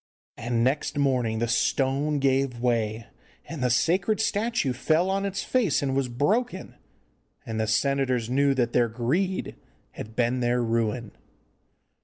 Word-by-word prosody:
And 115 0 -1
next 140 +3 0
morning 125 -5 +1
the 115 +1 0
stone 135 +5 +1
gave 135 -2 +1
way, 115 -2 -1 0.4
and 150 -2 -6
the 125 - +2
sacred 180 - +1
statue 215 - 0
fell 160 +8 +1
on 195 +1 0
its 195 0 -3
face 215 - +1
and 135 -1 -1
was 135 -1 +1
broken. 185 - -1 0.7
And 110 -1 -4
the 110 - 0
senators 130 0 +1
knew 135 +2 +2
that 120 -2 0
their 120 -1 +3
greed 155 - -2 0.3
had 110 +1 -9
been 125 +1 +1
their 120 0 +1
ruin. 115 0 -1
130 Hz, 145 wpm, -26 LUFS, 120-155 Hz, 0.7 s, their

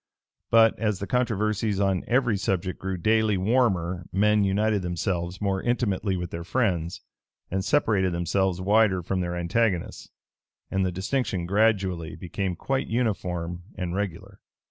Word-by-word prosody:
But, 115 -1 +5
as 105 -2 0
the 100 - -4
controversies 110 -3 0
on 95 -2 +1
every 125 -3 +2
subject 95 -2 -2
grew 95 -1 -3
daily 110 +2 +2
warmer, 95 -5 +1
men 105 +2 +3
united 105 +1 +1
themselves 90 0 -2
more 95 -2 0
intimately 105 -5 0
with 90 -1 -5
their 85 0 -5
friends, 90 -5 -1 0.5
and 95 +1 -1
separated 105 -8 +2
themselves 90 +2 0
wider 100 -1 +3
from 95 +3 -1
their 85 0 -2
antagonists; 90 +2 -1 0.6
and 95 0 +1
the 95 - 0
distinction 95 0 -1
gradually 95 -4 +1
became 95 0 -3
quite 135 +9 -2
uniform 90 -7 -2
and 90 -3 -3
regular. 95 -4 -4
95 Hz, 140 wpm, -26 LUFS, 90-110 Hz, 0.6 s, But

